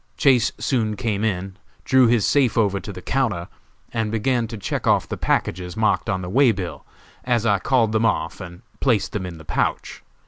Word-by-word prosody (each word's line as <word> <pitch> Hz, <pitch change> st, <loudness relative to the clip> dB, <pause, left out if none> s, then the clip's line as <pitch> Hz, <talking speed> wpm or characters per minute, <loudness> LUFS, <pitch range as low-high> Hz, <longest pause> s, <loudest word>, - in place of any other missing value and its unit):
Chase 130 Hz, -4 st, +4 dB
soon 110 Hz, -5 st, 0 dB
came 105 Hz, -1 st, -2 dB
in, 95 Hz, -3 st, -2 dB, 0.3 s
drew 130 Hz, -2 st, +5 dB
his 115 Hz, -3 st, +3 dB
safe 130 Hz, -6 st, +2 dB
over 100 Hz, -3 st, +2 dB
to 100 Hz, -, -7 dB
the 90 Hz, -2 st, -10 dB
counter, 115 Hz, -11 st, -1 dB, 0.5 s
and 110 Hz, -2 st, -1 dB
began 115 Hz, +1 st, 0 dB
to 115 Hz, 0 st, -7 dB
check 100 Hz, -, -3 dB
off -, -, +3 dB
the -, -, -4 dB
packages 90 Hz, +1 st, -1 dB
marked 105 Hz, -4 st, +1 dB
on 95 Hz, 0 st, -1 dB
the -, -, -5 dB
way 130 Hz, +4 st, +4 dB
bill, 95 Hz, -5 st, -5 dB, 0.4 s
as 120 Hz, -2 st, 0 dB
I 100 Hz, -3 st, +3 dB
called 115 Hz, +2 st, +2 dB
them 110 Hz, +1 st, +2 dB
off 110 Hz, -, -2 dB
and 90 Hz, +2 st, -10 dB, 0.2 s
placed 120 Hz, -7 st, +1 dB
them 95 Hz, -4 st, -3 dB
in 85 Hz, -2 st, -8 dB
the 80 Hz, -, -13 dB
pouch. -, -, -2 dB
110 Hz, 200 wpm, -22 LUFS, 95-120 Hz, 0.5 s, drew